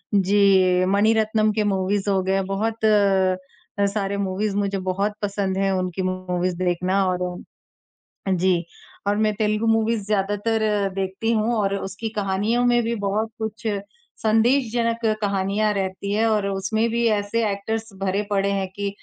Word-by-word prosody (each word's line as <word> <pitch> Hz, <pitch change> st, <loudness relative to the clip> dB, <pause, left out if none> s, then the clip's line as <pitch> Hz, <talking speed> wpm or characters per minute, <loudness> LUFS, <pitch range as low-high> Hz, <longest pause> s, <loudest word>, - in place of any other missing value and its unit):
जी, 190 Hz, -2 st, +4 dB
मनीरत्नम 215 Hz, +2 st, +2 dB
के 215 Hz, 0 st, +1 dB
मूवीज़ 195 Hz, 0 st, 0 dB
हो 195 Hz, -1 st, +2 dB
गए 190 Hz, -, 0 dB
हैं। 195 Hz, 0 st, +1 dB
बहुत 220 Hz, +3 st, -2 dB
अ, 195 Hz, -1 st, +1 dB
सारे 200 Hz, 0 st, -1 dB
मूवीज़ 200 Hz, +1 st, -1 dB
मुझे 200 Hz, -1 st, 0 dB
बहुत 200 Hz, +3 st, -1 dB
पसंद 200 Hz, -2 st, -1 dB
हैं 195 Hz, 0 st, +1 dB
उनकी 185 Hz, -1 st, -2 dB
मूवीज़ 185 Hz, -1 st, -2 dB
देखना 185 Hz, +2 st, +1 dB
और 180 Hz, 0 st, -1 dB, 1.1 s
जी, 180 Hz, -1 st, +2 dB, 0.4 s
और 205 Hz, -, +2 dB
मैं 215 Hz, 0 st, +2 dB
तेलुगु 215 Hz, +1 st, 0 dB
मूवीज़ 225 Hz, -1 st, +1 dB
ज़्यादातर 205 Hz, 0 st, 0 dB
देखती 195 Hz, +4 st, -1 dB
हूँ 220 Hz, +2 st, +1 dB
और 200 Hz, -2 st, 0 dB
उसकी 200 Hz, +3 st, -5 dB
कहानियों 205 Hz, +5 st, +1 dB
में 240 Hz, 0 st, +4 dB
भी 230 Hz, +1 st, -1 dB
बहुत 210 Hz, +1 st, -1 dB
कुछ 220 Hz, +1 st, -4 dB, 0.6 s
संदेशजनक 230 Hz, 0 st, +2 dB, 0.2 s
कहानियाँ 200 Hz, +1 st, 0 dB
रहती 195 Hz, 0 st, -3 dB
हैं 220 Hz, +2 st, +2 dB
और 210 Hz, -2 st, +1 dB
उसमें 205 Hz, +4 st, 0 dB
भी 235 Hz, +1 st, 0 dB
ऐसे 210 Hz, +2 st, 0 dB
एक्टर्स 220 Hz, +3 st, -3 dB
भरे 195 Hz, +1 st, 0 dB
पड़े 200 Hz, -1 st, +1 dB
हैं 195 Hz, -1 st, -1 dB
कि 200 Hz, 0 st, -2 dB
200 Hz, 150 wpm, -23 LUFS, 190-220 Hz, 1.1 s, जी